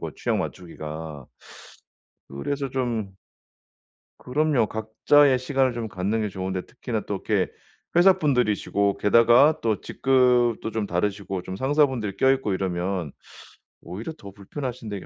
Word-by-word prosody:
그 - - -5
취향 - - -1
맞추기가. 80 -4 -7 1.0
그래서 135 - -3
좀 115 -7 -3 1.0
그럼요. 145 -3 +1
각자의 125 +6 +3
시간을 130 0 +1
좀 115 -2 -4
갖는 100 +4 -2
게 105 - -1
좋은데 95 -1 -4
특히나 - - -4
또 - - -2
이렇게 - - -1 0.5
회사분들이시고 125 - +3
게다가 120 +8 +5
또 110 -4 0
직급도 125 -4 +2
좀 110 -2 -2
다르시고 95 0 -2
좀 95 +1 -6
상사분들 130 -7 +1
껴있고 130 -5 +2
이러면 90 -3 -2 0.7
오히려 95 - -7
더 100 -1 -11
불편하신데 115 +1 -6
이게 - - -10
110 Hz, 300 characters per minute, -24 LUFS, 95-130 Hz, 1.0 s, 게다가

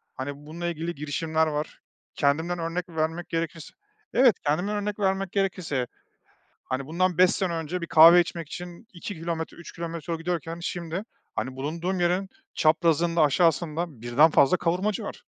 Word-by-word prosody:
hani, 140 +2 -4
bununla 170 +3 -4
ilgili 170 0 -3
girişimler 160 +2 0
var. 150 0 -4 0.3
Kendimden 160 +5 +1
örnek 170 +2 -3
vermek 160 +1 -2
gerekirse, 165 -1 -4 0.4
evet, 245 -3 +6
kendimden 180 +8 +1
örnek 205 0 -3
vermek 195 -1 0
gerekirse, 175 -10 -1 0.8
hani, 130 +1 -3
bundan 180 +3 0
5 185 -1 +7
sene 185 -3 -1
önce 165 +2 -3
bir - - -2
kahve 165 +2 +9
içmek 170 -2 -3
için 175 +5 -8
2 190 +3 -6
kilometre, 165 0 -4
3 170 - -10
kilometre 170 0 -5
yol 165 - -2
gidiyorken 165 -1 -3
şimdi, 170 +2 -4 0.3
hani, 130 0 -3
bulunduğum 170 +7 -2
yerin 180 +3 +1 0.3
çaprazında, 165 +1 +3
aşağısında 160 -1 +1
1'den 135 +7 +5
fazla 140 +4 +5
kavurmacı 185 +4 0
var. - - -8
170 Hz, 150 wpm, -26 LUFS, 155-180 Hz, 0.8 s, kahve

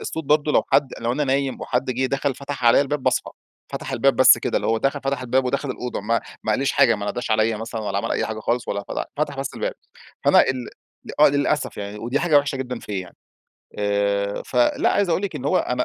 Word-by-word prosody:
الصوت 160 -1 -4
برضه 150 +1 +2
لو - - +3
حد 135 - +4
لو 120 +1 0
أنا 145 +2 0
نايم 135 0 -1
وحد 125 +1 -1
جيه 130 +1 0
دخل 135 +1 -1
فتح 140 -2 -6
عليَّ 120 +3 +6
الباب 145 0 -2
باصحى، - - 0 0.4
فتح - - -5
الباب - - +2
بس - - +7
كده - - -1
اللي - - -1
هو 115 - +2
دخل 135 +4 0
فتح 135 -1 -2
الباب 130 +1 +1
ودخل 140 +2 -1
الأوضة 125 -1 -4
ما 115 +3 0 0.2
ما 110 - +1
قاليش 135 +5 0
حاجة 130 -5 +4
ما 105 -1 -5
ناداش 120 +1 -3
عليّا 110 0 +2
مثلًا، 115 +1 -5
ولا 100 -1 -2
عمل - - -2
أي - - 0
حاجة 110 0 -5
خالص 120 +2 -1
ولا 100 0 -3
فتح - - -3
فتح 145 -2 -1
بس 135 - -5
الباب، - - -3 0.5
فأنا - - +6
ال 130 -2 -2 0.5
آه 150 - +8
للأسف 145 +1 0
يعني 100 +1 -6
ودي 120 +6 -1
حاجة 165 -4 +3
وحشة 145 -1 -2
جدًا 125 -2 -4
فيَّ 95 -3 -5 0.7
آآ، 100 0 0
فلأ 125 -1 +2
عايز 200 - +1
أقول 175 - +1
لِك 190 -6 -3
إن 130 - -7
هو - - +3
أنا 125 - -1
125 Hz, 230 wpm, -22 LUFS, 110-140 Hz, 0.7 s, آه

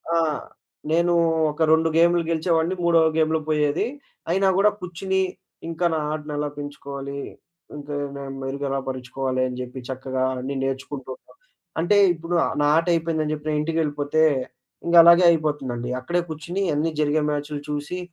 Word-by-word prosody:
ఆ! - - +3 0.7
నేను 170 +1 +3 0.4
ఒక 150 +2 -8
2 160 +1 +4
గేములు 170 +1 +4
గెలిచేవాడిని, 165 +2 +1
మూడో 170 -1 +4 0.2
గేములు 160 0 +2
పోయేది. 150 0 +1 0.4
అయినా 190 +2 +2
గూడా, 205 +2 +5
కూర్చొని 190 +2 -2 0.5
ఇంకా 165 +1 -2
నా 160 - 0
ఆడను 150 -1 -5
ఎలా 145 0 -1
పెంచుకోవాలి, 140 -1 -6 0.6
ఇంక 145 -1 -9 0.3
నేను 135 -1 -6
మెరుగ 140 +2 -4
ఎలా 135 0 -1
పరుచుకోవాలి, 130 0 -3
అని 125 - -6
చెప్పి 125 +1 -7
చక్కగా 130 0 -3 0.2
అన్నీ 135 +2 -4
నేర్చుకుంటూంటం. 135 0 -5 0.5
అంటే 205 +5 +3 0.2
ఇప్పుడు 165 +1 -6 0.3
నా 145 - +3
ఆట 165 - +2
అయిపోయిందని 160 -2 0
జెప్పి 150 0 -3
ఇంటికెళ్ళిపోతే 150 -1 0 0.6
ఇంకలాగే 170 +1 +7
అయిపోతుందండి. 135 -7 -2
అక్కడే 175 +7 -1
కూర్చొని 170 +5 -3
అన్నీ 150 +3 +1
జరిగే 150 +1 +2
మ్యాచులు 145 0 -3
చూసి. 150 +4 -3
150 Hz, 140 wpm, -23 LUFS, 140-165 Hz, 0.7 s, ఇంకలాగే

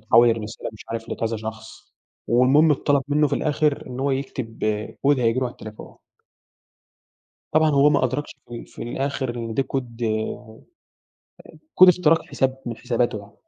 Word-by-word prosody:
تحوير، 115 +1 +5
ارسلها 105 0 -6
مش 110 - -13
عارف 115 0 -5
لكذا 115 0 -2
شخص، 110 0 -9 0.3
والمهم 130 +7 +5
اتطلب 140 0 +1
منه 150 0 +3
في - - 0
الآخر 150 -1 0
إن 125 0 -6
هو 140 +1 +1
يكتب 130 -4 -4 0.5
Code 145 -2 +4
هييجي 115 0 +1
له - - 0
على 120 - -7
التليفون. 110 -2 -11 1.6
طبعًا 155 0 +4
هو 145 0 +5
ما 140 -3 +2
أدركش 130 +4 -2
ف - - -14
في - - -10
الآخر 130 0 -3
إن 115 -1 -5
ده 135 - +2
Code 120 -3 -4
آآ 110 0 -3 1.2
Code 185 - +11
اختراق 165 -3 +4
حساب 135 0 -1
من 115 - -4
حساباته 120 -2 -1
يعني. 100 0 -13
125 Hz, 160 wpm, -23 LUFS, 115-140 Hz, 1.6 s, Code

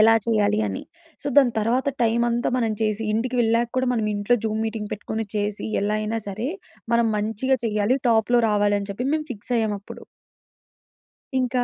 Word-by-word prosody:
ఎలా 225 +1 +7
చేయాలి 210 -2 +2
అని. 275 - -4 0.4
సో, - - -6
దాని 265 -4 +6
తర్వాత 245 +5 +1
టైమ్ 230 +1 +2
అంతా 235 +1 0
మనం 230 -3 +1
చేసి, 215 0 0
ఇంటికి 245 +3 -1
వెళ్ళాక 230 +1 +2
కూడా 255 0 +2
మనం 225 -2 0
ఇంట్లో 205 +4 +2
జూమ్ 220 0 -1
మీటింగ్ 220 -2 -4
పెట్టుకొని 220 +1 -4
చేసి, 205 0 -2 0.2
ఎలా 210 +1 +1
అయినా 220 +1 -2
సరే 220 +7 -3 0.5
మనం 235 -1 +3
మంచిగా 225 +5 0
చేయాలి. 210 +3 +1
టాప్‌లో 230 +1 +4
రావాలి 205 0 +2
అని 200 - -6
చెప్పి 250 +6 -3
మేము 305 -1 -2
ఫిక్స్ 220 +2 -7
అయ్యాం 220 -2 +1
అప్పుడు. - - -11 1.4
ఇంకా 250 -1 +1
225 Hz, 175 wpm, -23 LUFS, 210-240 Hz, 1.4 s, ఎలా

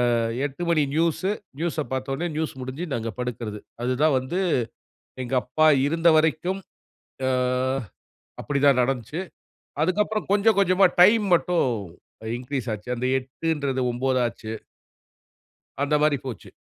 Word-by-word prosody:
அ - - +2 0.3
8:00 145 +4 -5
மணி 160 -3 +3
news, 170 +4 +1 0.3
நியூஸ 165 -3 -1
பாதோன்னே, 135 +5 -2
news 160 -1 -2
முடிஞ்சு 130 +7 -5
நாங்க 115 -1 -2
படுக்குறது. 115 -4 -4 0.2
அதுதான் 135 +4 +2
வந்து 130 +8 -3 0.8
எங்க 125 - -6
அப்பா 155 +5 +2 0.2
இருந்த 165 +2 +3
வரைக்கும் 160 +5 +1 0.7
அ - - +2 1.1
அப்படிதான் 140 -2 +3
நடந்துச்சு. 130 - -2 0.6
அதுக்கப்புறம் 210 +5 0
கொஞ்சம் 210 +1 +4
கொஞ்சமா, 190 +1 +4 0.2
டைம் 210 +4 +7
மட்டும் 175 -2 +1 0.6
அ - - -6
இன்க்ரீஸ் 130 -1 -4
ஆச்சு. 105 +3 -8
அந்த 125 - -2
8ன்றது 135 0 -2
9தாச்சு. 120 -3 -1 1.3
அந்த 145 +1 +2
மாறி 150 -1 +3
போச்சு. 115 -9 -7
145 Hz, 120 wpm, -24 LUFS, 130-170 Hz, 1.3 s, டைம்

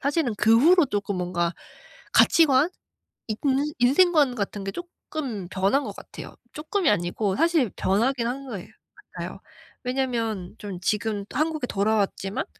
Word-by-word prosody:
사실은 280 -4 0
그 225 +2 +5
후로 340 +4 +5
쪼끔 205 -4 -2
뭔가 175 -1 -1 0.6
가치관, 305 0 +5 0.6
인 215 -2 -3 0.4
인생관 285 +1 +4
같은 200 -1 -3
게 195 - -3
쪼끔 280 - -6
변한 195 +10 +1
것 - - -6
같아요. - - -10 0.2
쪼끔이 320 +4 0
아니고 190 +1 0
사실 325 - +2
변하긴 235 +5 +1
한 270 +3 -4
거예 200 -8 -7 0.5
같아요. - - -6 0.4
왜냐면 235 -7 -2
좀 195 -4 -6
지금 210 0 -1
또 - - -6
한국에 310 -4 0
돌아왔지만 200 -1 -1
230 Hz, 285 characters per minute, -25 LUFS, 200-285 Hz, 0.6 s, 그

